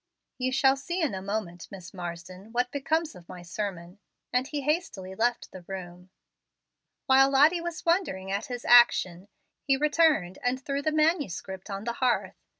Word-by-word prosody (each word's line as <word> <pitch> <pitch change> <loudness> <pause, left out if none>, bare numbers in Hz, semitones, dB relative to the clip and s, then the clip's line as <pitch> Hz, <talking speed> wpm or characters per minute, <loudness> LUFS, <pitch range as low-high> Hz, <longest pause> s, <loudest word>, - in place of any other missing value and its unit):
"You 255 0 0
shall 265 +1 +4
see 345 +7 -4
in 315 - 0
a 190 - -4
moment, 190 -4 -4
Miss 185 -3 -11
Marsden 180 +3 -8
what 245 +1 0
becomes 315 +3 -1
of 175 -1 -15
my 180 -1 -9
sermon," 180 0 -6 0.3
and 250 +1 +1
he 295 -1 -3
hastily 270 - -2
left 235 +4 -1
the 185 - -10
room. 180 -1 -8 1.0
While 270 0 +5
Lottie 300 +6 +4
was 340 -1 -6
wondering 265 - 0
at 200 +1 -2
his 245 -1 -6
action, 195 -6 +5 0.3
he 270 -1 +1
returned 300 - +2
and 250 +1 0
threw 275 +1 -3
the 310 - 0
manuscript 290 - -1
on 195 0 -5
the 235 +1 -2
hearth. 245 0 -1
240 Hz, 165 wpm, -27 LUFS, 190-285 Hz, 1.0 s, While